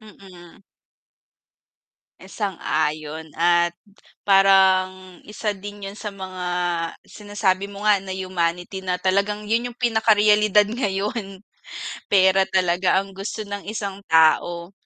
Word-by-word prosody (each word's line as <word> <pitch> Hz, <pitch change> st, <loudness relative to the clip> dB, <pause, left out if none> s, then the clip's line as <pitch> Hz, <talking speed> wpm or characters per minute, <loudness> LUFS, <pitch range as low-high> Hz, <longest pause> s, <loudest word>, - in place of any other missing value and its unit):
Mm. 195 Hz, -3 st, -16 dB, 1.6 s
Sang-ayon 160 Hz, -6 st, -3 dB
at 175 Hz, 0 st, +2 dB, 0.5 s
parang 190 Hz, -2 st, +3 dB
isa 210 Hz, 0 st, -3 dB
din 205 Hz, +1 st, -9 dB
yun 195 Hz, -, -6 dB
sa 210 Hz, +1 st, -7 dB
mga 190 Hz, -2 st, -7 dB, 0.6 s
sinasabi 200 Hz, -2 st, -2 dB
mo 200 Hz, +1 st, -9 dB
nga 210 Hz, -2 st, +4 dB
na 190 Hz, -, -12 dB
humanity 180 Hz, 0 st, -2 dB
na 185 Hz, -1 st, -2 dB
talagang 200 Hz, +3 st, 0 dB
yun 230 Hz, +3 st, 0 dB
yung 240 Hz, -, -13 dB
pinaka 225 Hz, -3 st, +2 dB
realidad 210 Hz, 0 st, +4 dB
ngayon, 205 Hz, -2 st, -3 dB, 0.7 s
pera 190 Hz, -1 st, +5 dB
talaga 185 Hz, 0 st, +2 dB
ang 195 Hz, 0 st, -5 dB
gusto 205 Hz, +2 st, -5 dB
ng 200 Hz, 0 st, -6 dB
isang 200 Hz, -2 st, -5 dB
tao. 170 Hz, +2 st, +3 dB
195 Hz, 115 wpm, -22 LUFS, 185-210 Hz, 1.6 s, pera